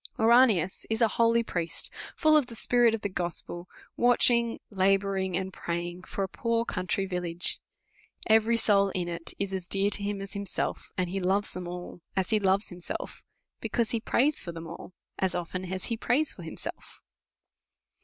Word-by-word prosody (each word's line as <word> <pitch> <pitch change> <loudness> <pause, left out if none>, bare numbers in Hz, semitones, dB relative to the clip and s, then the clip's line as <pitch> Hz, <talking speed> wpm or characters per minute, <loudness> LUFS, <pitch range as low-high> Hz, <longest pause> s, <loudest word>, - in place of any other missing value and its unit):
Ouranius 225 -6 +4
is 225 0 0
a 230 - +5
holy 230 0 +4
priest, 170 -6 -2 0.2
full 310 -1 +4
of 295 -5 +4
the 235 - -9
spirit 240 0 +4
of 220 - -7
the - - -1
gospel, 175 -1 -4 0.3
watching, 235 -1 +3
labouring, 195 -1 +1
and 190 0 -4
praying 175 +1 -4
for 195 - -4
a - - -1
poor 230 +3 -1
country 185 0 -1
village. 180 -2 -1 0.7
Every 225 +1 +4
soul 200 -3 +4
in 180 -2 -1
it 170 -1 -4
is 195 -1 -3
as 185 -2 -4
dear 195 +2 +1
to 205 - +1
him 200 0 -2
as 195 0 -6
himself; 200 -1 -3
and 185 - +1
he 195 - -1
loves 195 +2 0
them 180 -1 -5
all 175 0 -7
as 190 +1 0
he 215 - +4
loves 195 +1 +2
himself; 175 -1 -5 0.4
because 235 -3 -1
he 230 - 0
prays 275 +6 +2
for 170 - -5
them 165 0 -8
all, 170 +2 -9 0.3
as 190 -1 +1
often 180 +1 -4
as 185 -1 -2
he 230 - -1
prays 275 +6 +3
for - - -12
himself. 165 - -6
195 Hz, 180 wpm, -28 LUFS, 180-230 Hz, 0.7 s, a